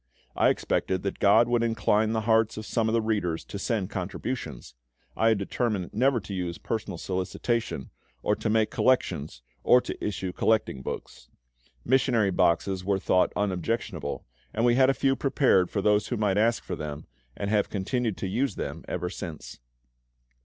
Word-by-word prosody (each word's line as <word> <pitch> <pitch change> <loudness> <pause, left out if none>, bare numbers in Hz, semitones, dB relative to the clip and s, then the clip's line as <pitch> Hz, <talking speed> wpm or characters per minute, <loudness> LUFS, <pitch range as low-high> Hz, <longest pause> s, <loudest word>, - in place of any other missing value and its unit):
I - - +4
expected 95 -1 0
that 100 - -3
GOD 110 +4 +5
would 120 -1 +2
incline 110 -1 +2
the 110 0 0
hearts 110 0 +2
of 110 - -5
some 110 0 0
of - - -1
the 115 -1 +2
readers 100 -7 -1
to 100 - -7
send 105 -4 -1
contributions: 95 - -5 0.4
I 115 - +2
had 110 -2 +4
determined 100 -2 -2
never 125 +3 +3
to 100 - -7
use 90 -2 -3
personal 105 -5 -4
solicitation, 95 - -2 0.3
or - - +2
to - - -3
make 110 0 +2
collections, 75 - 0 0.2
or 125 - +6
to - - -6
issue 95 -3 -3
collecting 110 -13 +1
books. - - -7 0.6
Missionary 120 -5 +3
boxes 90 +2 +1
were 100 0 +1
thought 95 -1 +2
unobjectionable, 95 -4 -2 0.3
and 115 +2 +2
we 120 - +5
had 130 +1 +5
a 135 - +2
few 135 0 +2
prepared 130 -10 +3
for 100 - -2
those 105 0 +3
who 120 - -2
might 105 -2 +1
ask 115 +2 +2
for - - -4
them, 75 0 -6 0.3
and 100 0 -2
have 105 -2 +2
continued 110 +2 -1
to 95 - -3
use 125 +8 -1
them 75 +3 -5
ever 90 0 -3
since. 75 -10 -8
105 Hz, 175 wpm, -27 LUFS, 95-115 Hz, 0.6 s, or